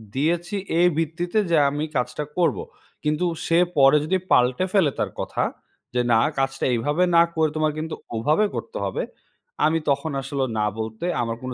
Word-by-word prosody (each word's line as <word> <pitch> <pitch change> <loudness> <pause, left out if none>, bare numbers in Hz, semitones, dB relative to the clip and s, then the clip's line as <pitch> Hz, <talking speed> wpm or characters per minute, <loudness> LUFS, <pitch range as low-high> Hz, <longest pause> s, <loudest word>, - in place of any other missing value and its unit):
দিয়েছি 170 +7 0 0.2
এই 175 - +6
ভিত্তিতে 170 +5 -1
যে 165 - +5
আমি 145 +2 -3
কাজটা 125 +3 -1
করবো। 180 - +1 0.4
কিন্তু 150 +3 0 0.2
সে 165 - +3 0.2
পরে 135 +1 +6
যদি 190 +4 +1
পাল্টে 125 +8 +3
ফেলে 185 -8 +4
তার - - -1
কথা, - - -1 0.5
যে 125 - +2
না 115 - +5 0.2
কাজটা 135 0 -1
এইভাবে 145 +9 +1
না 170 - +8
করে 160 -1 +2
তোমার 155 0 +2
কিন্তু 160 +1 -4 0.2
ওভাবে 150 - +2
করতে 465 +2 -5
হবে। - - -2 0.6
আমি 160 +1 +3
তখন 150 +3 0
আসলে 135 0 -2 0.2
না 105 - +2
বলতে 110 +6 -4 0.2
আমার 115 -1 -2
কোনো 130 0 -4
150 Hz, 170 wpm, -23 LUFS, 130-170 Hz, 0.6 s, না